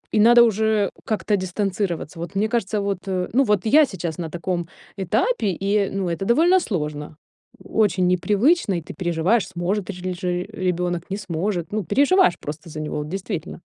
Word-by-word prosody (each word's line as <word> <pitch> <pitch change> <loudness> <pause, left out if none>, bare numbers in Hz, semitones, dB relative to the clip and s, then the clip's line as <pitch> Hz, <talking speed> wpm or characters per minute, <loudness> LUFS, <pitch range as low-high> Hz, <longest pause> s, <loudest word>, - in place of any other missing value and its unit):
и - - +4
надо 240 +3 +7
уже 220 -2 +2 0.2
как-то 215 -1 0
дистанцироваться. 185 -3 -3
Вот, 170 +3 -6
мне 205 +2 +2
кажется, 220 -2 -1
вот, 200 -2 -2
ну, 190 +8 +1
вот 210 -5 +1
я 295 +7 +6
сейчас 175 - -5
на 165 -2 -3
таком 175 +1 -3 0.3
этапе, 215 - 0
и, 200 0 +1
ну, 195 -1 -1
это 170 +3 -3
довольно 335 - +4
сложно. 150 - -4 0.5
Очень 190 -4 +1
непривычно, 205 - +2
и - - -4
ты 155 - -10
переживаешь, 175 +6 +1
сможет 180 +2 -2
тжрли 180 -1 -5
же 180 +1 -5 0.2
ребёнок 180 -1 -2
не 195 - -2
сможет. 175 -2 -3
Ну, 215 0 -1
переживаешь 365 - +4
просто 155 +4 -7
за 155 - -7
него, 155 0 -4
вот 150 0 -4
действительно. 185 -2 -5
190 Hz, 170 wpm, -22 LUFS, 175-215 Hz, 0.5 s, надо